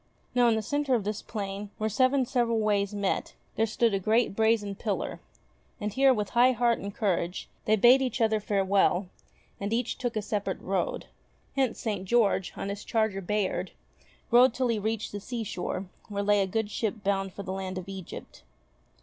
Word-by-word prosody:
Now 245 -1 +4
in 230 - +4
the 220 - -1
centre 285 +2 +1
of 225 - 0
this 210 +1 -3
plain, 200 -1 -5
where 215 - -1
seven 255 +4 +3
several 235 -2 +1
ways 205 -2 +1
met, 200 -2 -2 0.2
there 225 - +2
stood 225 +1 +1
a 195 - +1
great 220 +2 +2
brazen 220 -2 +2
pillar, 205 0 -3 0.6
and 210 -2 -3
here, 270 +3 +5
with 210 -5 0
high 250 +2 +5
heart 240 -1 +2
and 200 - -5
courage, 185 -4 -1 0.2
they 215 - +4
bade 240 +5 +6
each 255 -2 -1
other 220 -1 +3
farewell, 195 -2 +2 0.5
and 200 +1 -3
each 235 +1 -1
took 245 -2 -2
a 215 - -1
separate 200 -2 -2
road. 185 -2 -2 0.5
Hence, 265 -4 +1
St. 205 -5 -2
George, 200 -4 +2
on 195 - -3
his 200 0 -5
charger 220 -4 0
Bayard, 205 +1 -1 0.6
rode 245 0 +6
till 255 -1 0
he 225 -2 +1
reached 220 +1 -2
the 205 - -5
seashore 205 -4 -4 0.2
where 200 -1 -2
lay 205 0 +4
a 195 - +1
good 215 +2 -2
ship 215 0 -2
bound 195 -1 0
for 200 - -7
the 185 - -4
land 190 -1 -4
of 185 0 -6
Egypt. 190 -3 -9
210 Hz, 190 wpm, -28 LUFS, 195-235 Hz, 0.6 s, bade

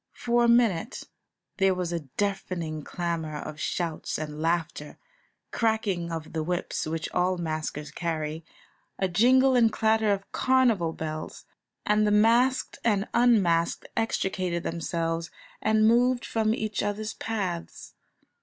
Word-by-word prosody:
For 240 0 +1
a - - +4
minute 230 -4 +2 0.5
there 195 -2 +3
was 180 -2 -2
a 170 - -1 0.2
deafening 185 -6 -2
clamour 165 -1 -3
of 150 +1 -7
shouts 165 -1 -2
and 150 0 -5
laughter, 165 -2 -2 0.5
cracking 210 -7 0
of 160 -1 -6
the 160 - -1
whips, 175 0 -2
which 160 0 -3
all 180 +1 +1
maskers 155 -3 -4
carry, 160 -2 -3 0.5
a 190 - +1
jingle 255 +8 +4
and 230 -2 +5
clatter 220 -1 +2
of 195 0 -3
carnival 240 -10 +2
bells, 155 -1 -6 0.4
and 210 0 +3
the - - +2
masked 235 +5 +3
and 205 -3 +1
unmasked 195 -9 +2
extricated 185 -6 -1
themselves 165 0 -2 0.3
and 215 0 +3
moved 245 +2 +3
from 220 -1 +1
each 215 -3 -2
other's 210 +2 -3
paths. 190 -7 -4
185 Hz, 130 wpm, -27 LUFS, 165-220 Hz, 0.5 s, and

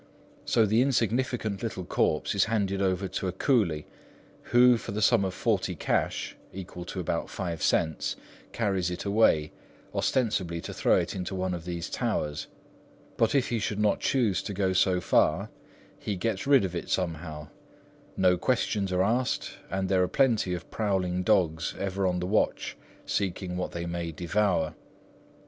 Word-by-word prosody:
So 115 -2 +3
the 110 +3 +3
insignificant 120 -4 0
little 100 -6 -4
corpse - - +1
is - - +3
handed 100 -3 0
over 95 0 +1
to 95 - -3
a - - 0
coolie, 95 - +1 0.6
who, 125 0 +6
for 105 - -6
the 105 - -2
sum 110 -2 +4
of 95 - -1
forty - - 0
cash, - - -1 0.2
equal 90 -2 -8
to 95 - -5
about 85 -1 -2
five 85 -4 -4
cents, 80 -1 +1 0.4
carries 95 -5 0
it 90 - -5
away, 100 -7 +3 0.4
ostensibly 100 -9 0
to - - -7
throw - - +3
it - - -1
into 95 +1 -4
one 95 0 -1
of 85 -1 -6
these 85 -1 -4
towers; 75 0 -2 0.7
but 115 +4 +2
if 135 - +2
he 120 - 0
should 105 0 -2
not 105 -1 +2
choose 110 -9 +1
to 100 - -5
go 95 -1 +1
so 95 0 +3
far, - - +2 0.5
he 105 - -3
gets 100 +4 -2
rid 140 -7 +5
of 90 -1 -4
it 85 - -4
somehow,—no 85 +2 -3
questions 105 -4 0
are 90 0 +2
asked, 120 +5 -1
and 95 0 -1
there 95 -1 +3
are 90 - +3
plenty 115 -9 +2
of 90 - -9
prowling 95 -4 0
dogs 90 -5 +1
ever 95 0 -1
on 90 -1 0
the 90 - -2
watch 105 +4 0 0.3
seeking 95 -2 -2
what 90 - -2
they 85 0 -4
may 85 -1 -3
devour. 85 0 0
95 Hz, 165 wpm, -28 LUFS, 90-110 Hz, 0.7 s, who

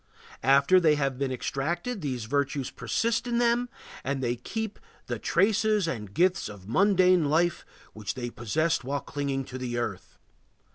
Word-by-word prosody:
After 140 +8 +5
they 155 -4 +4
have 135 -3 -1
been 135 -1 -1
extracted 170 - -2
these 125 -6 -3
virtues 140 +1 -1
persist 230 +1 -1
in 240 -1 0
them 240 +1 +2 0.3
and 140 0 -1
they 120 0 0
keep 220 - -5 0.3
"the - - -4
traces 210 -1 +2
and 105 -10 -4
gifts 180 - +2
of 100 -2 -11
mundane 185 - +4
life 170 +3 +2 0.3
which 105 -2 -5
they 120 -2 -4
possessed 150 +7 0
while 140 +2 -2
clinging 140 -2 -3
to 130 0 -7
the 120 -2 -3
earth." 105 -6 -4
145 Hz, 155 wpm, -27 LUFS, 125-185 Hz, 0.3 s, After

